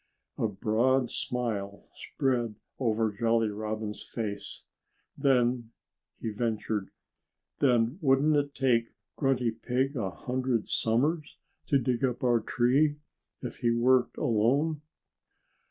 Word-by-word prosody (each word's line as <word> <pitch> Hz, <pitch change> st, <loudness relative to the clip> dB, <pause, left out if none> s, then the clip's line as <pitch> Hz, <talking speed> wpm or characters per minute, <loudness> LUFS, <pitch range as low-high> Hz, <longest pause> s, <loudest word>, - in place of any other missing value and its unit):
A 115 Hz, -, +2 dB
broad 120 Hz, +5 st, +1 dB
smile 105 Hz, -5 st, -2 dB
spread 120 Hz, -5 st, -1 dB, 0.2 s
over 110 Hz, -3 st, +1 dB
Jolly 115 Hz, +1 st, +1 dB
Robin's 105 Hz, 0 st, -4 dB
face. 100 Hz, -3 st, -5 dB, 0.5 s
"Then 125 Hz, -3 st, +2 dB, 0.3 s
" -, -, -50 dB
he 115 Hz, -, -3 dB
ventured 110 Hz, -2 st, -2 dB, 0.7 s
"then 125 Hz, +2 st, +2 dB
wouldn't 145 Hz, +1 st, +4 dB
it 145 Hz, -1 st, 0 dB
take 120 Hz, -4 st, +1 dB, 0.2 s
Grunty 130 Hz, -4 st, +1 dB
Pig 125 Hz, +5 st, -1 dB
a 105 Hz, -7 st, -1 dB
hundred 125 Hz, +2 st, -2 dB
summers 145 Hz, +8 st, 0 dB, 0.3 s
to 140 Hz, -, +4 dB
dig 125 Hz, 0 st, -1 dB
up 130 Hz, 0 st, 0 dB
our 120 Hz, -2 st, +4 dB
tree, 130 Hz, +7 st, +2 dB, 0.5 s
if -, -, -5 dB
he 120 Hz, -, +1 dB
worked 125 Hz, +2 st, +3 dB
alone?" 140 Hz, +5 st, +1 dB
120 Hz, 115 wpm, -29 LUFS, 110-135 Hz, 0.7 s, wouldn't